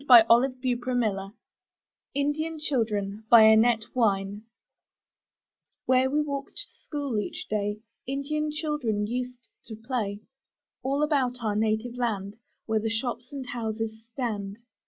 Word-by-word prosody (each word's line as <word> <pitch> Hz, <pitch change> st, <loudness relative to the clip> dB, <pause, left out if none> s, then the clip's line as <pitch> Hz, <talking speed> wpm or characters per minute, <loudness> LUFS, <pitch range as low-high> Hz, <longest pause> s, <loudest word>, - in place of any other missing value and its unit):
1 235 Hz, -3 st, +10 dB
20 255 Hz, +2 st, +3 dB
UP 240 Hz, -, -4 dB
ONE -, -, -15 dB
PAIR 255 Hz, +1 st, -2 dB, 0.2 s
OF 195 Hz, -, -4 dB
STAIRS 195 Hz, -, -6 dB
;^^ 200 Hz, -, -15 dB, 0.8 s
INDIAN 300 Hz, +3 st, 0 dB
CHILDREN* 215 Hz, -8 st, -1 dB
By 230 Hz, -2 st, +9 dB
Annette 220 Hz, +1 st, +5 dB
Wynne 205 Hz, -3 st, 0 dB, 1.4 s
Where 260 Hz, 0 st, +4 dB
we 300 Hz, +2 st, +2 dB
walk 280 Hz, -1 st, -3 dB
to -, -, -3 dB, 0.2 s
school 285 Hz, -7 st, -2 dB
each 205 Hz, -, -5 dB
day, 210 Hz, 0 st, -1 dB, 0.3 s
Indian 295 Hz, +3 st, -1 dB
children 295 Hz, -9 st, -1 dB
used 250 Hz, +1 st, -5 dB, 0.2 s
to 220 Hz, -, -7 dB
play 220 Hz, -3 st, -3 dB, 0.3 s
— -, -, -66 dB
All 275 Hz, +3 st, +1 dB
about 275 Hz, -5 st, +1 dB
our 210 Hz, -2 st, 0 dB
native 220 Hz, +3 st, 0 dB
land, 210 Hz, -4 st, -2 dB, 0.3 s
Where 220 Hz, -1 st, +1 dB
the 225 Hz, +1 st, -1 dB
shops 240 Hz, +3 st, -3 dB
and 275 Hz, -2 st, -5 dB
houses 220 Hz, -1 st, -4 dB
stand. 210 Hz, -5 st, -3 dB
235 Hz, 150 wpm, -27 LUFS, 215-265 Hz, 1.4 s, 1